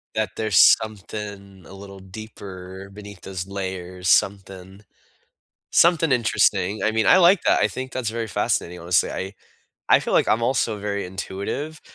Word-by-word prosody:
That 110 -1 -1
there's 110 -5 +6
something 100 -3 -8
a - - -13
little 100 0 -11
deeper 95 -1 -10
beneath 100 -2 -11
those 95 -1 -6
layers, 95 -2 -6
something, 95 0 0 0.9
something 165 -2 +4
interesting, 110 -5 +1
I 110 - +2
mean, 110 0 0
I 185 - +7
like 180 +1 +5
that, - - +3
I - - +3
think 130 0 -7
that's 125 -4 -2
very 115 0 -4
fascinating, 90 -3 -2
honestly, 85 +1 +1
I 95 +2 -5 0.6
I - - +7
feel - - -4
like - - +3
I'm 110 - +2
also 115 -3 0
very 100 -1 -3
intuitive. 100 +11 -5
100 Hz, 155 wpm, -22 LUFS, 95-110 Hz, 0.9 s, I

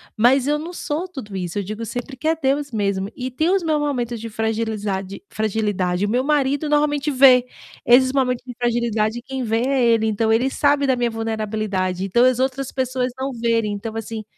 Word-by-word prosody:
mas 250 +4 +4
eu 295 +1 +1
não 335 +3 -6
sou 330 +3 -3
tudo 235 - -8
isso, 180 0 -4
eu 200 - -1
digo 215 +4 -6
sempre 245 +4 -6
que 310 - -4
é 325 - +3
Deus 285 -1 -1
mesmo, 200 -2 -1
e 255 0 -4
tem 315 +7 0
os 385 -2 +2
meus 310 -2 +1
momentos 245 -5 -2
de 230 +1 -6
fragilizade 215 - -3
fragilidade, 205 -4 -1
o - - -2
meu 250 +3 +1
marido 285 0 +1
normalmente 295 0 +1
vê 255 -2 +6 0.4
esses 260 +2 +5
momentos 250 -3 0
de 250 - -7
fragilidade, 235 -1 0
quem 265 -1 -5
vê 225 +1 0
é 270 -2 +1
ele, 225 -1 +3
então 220 +1 +1
ele 250 +4 +2
sabe 285 -1 +2
da 260 -1 +2
minha 240 -1 0
vulnerabilidade, 215 -4 -2
então 235 +6 +3
as 255 -1 +3
outras 265 0 -1
pessoas 255 -1 -1
não 270 +1 -2
verem, 230 -2 0
então 220 +2 -6
assim 225 0 -5
240 Hz, 200 wpm, -21 LUFS, 215-270 Hz, 0.4 s, vê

